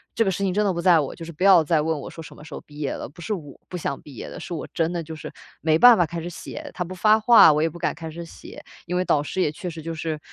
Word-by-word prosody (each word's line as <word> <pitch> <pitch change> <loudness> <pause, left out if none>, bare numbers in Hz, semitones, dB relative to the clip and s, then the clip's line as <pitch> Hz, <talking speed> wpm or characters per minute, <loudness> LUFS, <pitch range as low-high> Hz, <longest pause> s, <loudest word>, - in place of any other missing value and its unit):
这 230 - +3
个 200 - +1
事 200 - -3
情 190 -2 0
真 210 +2 +1
的 200 - +2
不 170 - -4
在 175 -2 +5
我， 145 - -3
就 165 - -9
是 170 - -8
不 160 - -5
要 190 -4 +7
再 155 0 +2
问 160 0 -1
我 - - -8
说 165 - -9
什 - - -12
么 - - -14
时 - - -11
候 - - -7
毕 145 - -16
业 145 -2 -2
了， - - -6
不 170 - -15
是 215 - -2
我 150 -8 -8
不 - - -7
想 150 -5 -3
毕 145 - -13
业 - - -7
的， - - -9
是 - - -7
我 165 - -5
真 165 +1 0
的 170 - -2
就 160 0 -8
是 155 - -8 0.3
没 160 0 +2
办 245 +2 +8
法 175 - +3
开 165 +1 -6
始 170 - -5
写， 175 - -8
他 180 - -2
不 180 +1 -8
发 215 +4 +4
话， 220 -6 +7
我 150 +1 +1
也 - - +3
不 170 - -12
敢 170 - -1
开 160 -1 -7
始 170 +2 -7
写， 165 - -12 0.2
因 180 - -3
为 180 - +1
导 150 -5 +1
师 185 +5 -3
也 150 - +1
确 180 +4 -8
实 165 -1 -8
就 165 +1 -5
是- 155 -1 -4
165 Hz, 370 characters per minute, -23 LUFS, 155-180 Hz, 0.3 s, 办